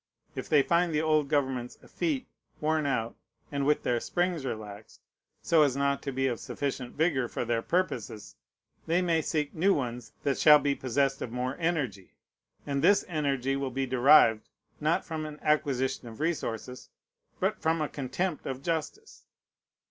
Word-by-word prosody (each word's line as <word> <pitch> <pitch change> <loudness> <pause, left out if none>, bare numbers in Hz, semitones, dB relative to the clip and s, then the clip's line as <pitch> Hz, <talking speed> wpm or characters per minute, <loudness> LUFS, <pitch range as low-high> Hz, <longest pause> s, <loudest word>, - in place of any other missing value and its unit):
If - - -6
they 145 -3 +5
find 170 +2 +2
the 150 - +2
old 155 -2 +2
governments 130 -4 -1
effete, 290 -7 -2 0.3
worn 155 -1 +1
out, 120 -4 -1 0.4
and 140 -1 -1
with 150 - +2
their 120 -1 +1
springs 175 -1 -1
relaxed, 110 -2 -7 0.4
so 165 -2 +4
as 140 -4 +3
not 140 0 +1
to 140 - -4
be 135 0 -1
of 120 -4 -1
sufficient 135 -3 -4
vigor 145 -5 +1
for 120 - -4
their 115 -1 0
purposes, 125 - -2 0.5
they 170 +3 +2
may 165 -2 +2
seek 150 -2 -2
new 190 +5 +3
ones 125 -3 -4
that 140 -2 0
shall 150 -1 +8
be 145 -1 0
possessed 135 +1 0
of 115 - -4
more 125 +2 -2
energy; 135 - -2 0.5
and 140 -1 -1
this 200 - +5
energy 140 -5 -1
will 135 -1 -2
be 135 +1 -2
derived, 125 -3 +5 0.3
not 155 +2 +1
from 160 -1 -4
an 150 -1 -9
acquisition 140 -5 0
of 110 -1 -10
resources, 130 -6 -3 0.5
but - - -1
from 160 +1 +1
a 150 - 0
contempt 145 +6 -3
of 135 0 -5
justice. 170 - -4
140 Hz, 165 wpm, -29 LUFS, 125-160 Hz, 0.5 s, shall